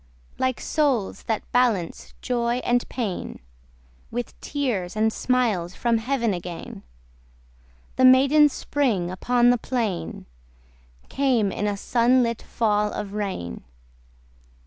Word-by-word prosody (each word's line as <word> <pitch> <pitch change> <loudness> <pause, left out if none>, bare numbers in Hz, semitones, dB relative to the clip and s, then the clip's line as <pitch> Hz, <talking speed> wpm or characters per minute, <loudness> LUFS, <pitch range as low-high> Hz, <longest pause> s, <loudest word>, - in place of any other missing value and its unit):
Like 260 -1 0
souls 275 -10 0
that 220 -2 -1
balance 230 -9 0
joy 240 -1 0
and 245 0 +1
pain, 220 -8 -4 0.7
With 245 +1 -4
tears 235 -12 -2
and 220 +1 +1
smiles 220 -9 0
from 235 -2 +1
heaven 235 -2 0
again 175 -1 -7 1.2
The 260 - +5
maiden 275 +4 +6
Spring 235 -11 -1
upon 245 +6 +3
the 245 - +1
plain 220 - -3 0.8
Came 250 -7 +1
in 210 - -2
a 205 -1 -1
sun 245 +4 +3
lit 230 -1 -2
fall 210 -2 0
of 200 -1 -5
rain. 195 - -4
235 Hz, 115 wpm, -24 LUFS, 205-255 Hz, 1.2 s, maiden